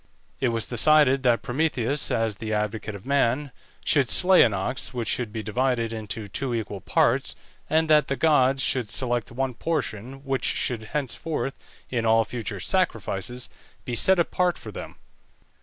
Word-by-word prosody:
It 130 - +1
was 115 -2 -1
decided 135 +2 +4
that 120 -3 +2
Prometheus, 140 -1 0
as 110 -3 -1
the 110 +1 -4
advocate 105 0 -3
of 100 - -11
man, 140 0 +1 0.3
should 140 -5 +3
slay 185 0 +6
an 115 - +5
ox, 120 +7 -2
which 120 -3 -3
should 120 -2 -1
be 110 0 -5
divided 115 +1 -1
into 110 -1 -5
two 125 +5 -3
equal 105 -3 -4
parts, - - +1 0.3
and 160 +2 +2
that 150 -2 +4
the 135 - -1
gods 135 -3 +3
should 125 -5 0
select 120 -1 0
one 130 +1 -2
portion 135 -2 -4
which 135 -1 -1
should 115 -3 -1
henceforth, 145 +2 -3 0.4
in 120 -3 -1
all 115 0 +4
future 110 -5 -5
sacrifices, 120 - -1 0.4
be 125 - -4
set 190 +10 +4
apart 175 +1 +1
for 110 - -9
them. - - -8
125 Hz, 160 wpm, -25 LUFS, 110-140 Hz, 0.4 s, slay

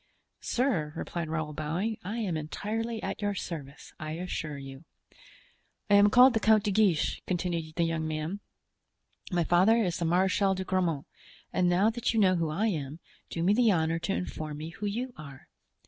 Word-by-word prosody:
"Sir," 230 - 0
replied 170 -1 -4
Raoul, 155 -1 -2
bowing, 170 +9 -2
"I 210 +6 -4
am 200 -8 -1
entirely 220 +9 -3
at - - -4
your 205 -1 -1
service, 150 -6 -7
I 155 -1 -4
assure 160 -3 -4
you." 135 +1 -9 1.1
"I - - +6
am 205 0 +7
called 250 +3 +7
the 225 - +2
Count 220 -1 +4
de 210 - 0
Guiche," 195 -6 +2
continued 170 -3 -2
the 170 - +2
young 165 -1 -1
man; 155 +5 -3 0.9
"my 175 -1 +2
father 185 +7 +4
is 185 -7 0
the 170 - -1
Marechal 190 +3 +2
de 190 - -3
Grammont; 180 -6 0 0.5
and 180 -1 +2
now 190 +5 +3
that 235 0 -1
you - - +3
know 185 -3 +4
who 165 -2 0
I 180 +9 0
am, 155 -7 -2 0.3
do 165 - -3
me 190 +4 +4
the 235 +1 +4
honor 165 -2 +1
to 175 +3 -1
inform 155 -4 -4
me 155 +2 -6
who 205 +5 -5
you 245 +5 -3
are." 140 -3 -11
180 Hz, 185 wpm, -29 LUFS, 155-205 Hz, 1.1 s, am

